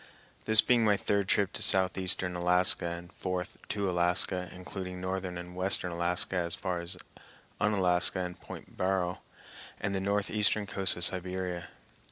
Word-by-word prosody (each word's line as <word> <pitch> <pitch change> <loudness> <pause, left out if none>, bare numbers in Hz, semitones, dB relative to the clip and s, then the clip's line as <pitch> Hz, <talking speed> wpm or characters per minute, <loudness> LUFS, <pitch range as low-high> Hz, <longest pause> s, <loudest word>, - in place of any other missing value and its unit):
this 110 0 +7
being 120 -1 +3
my 105 -2 +3
third 100 -1 0
trip 100 0 +1
to - - -3
southeastern 95 -1 +2
Alaska 90 0 +3
and 85 0 -7
fourth 90 0 -4
to 100 -1 -2
Alaska, 90 +1 +1
including 90 0 -7
northern 95 -1 -3
and 90 0 -8
western 90 -1 -1
Alaska 85 +2 +1
as 85 -2 0
far 90 -3 -3
as 85 +1 -6 0.6
Unalaska 95 -3 +2
and 90 -1 -5
Pt. - - -10
Barrow 90 -1 -1 0.6
and 100 0 -2
the 95 - 0
northeastern 105 +1 +1
coast 95 -2 0
of 90 - 0
Siberia. 90 -1 0
90 Hz, 150 wpm, -30 LUFS, 90-95 Hz, 0.6 s, this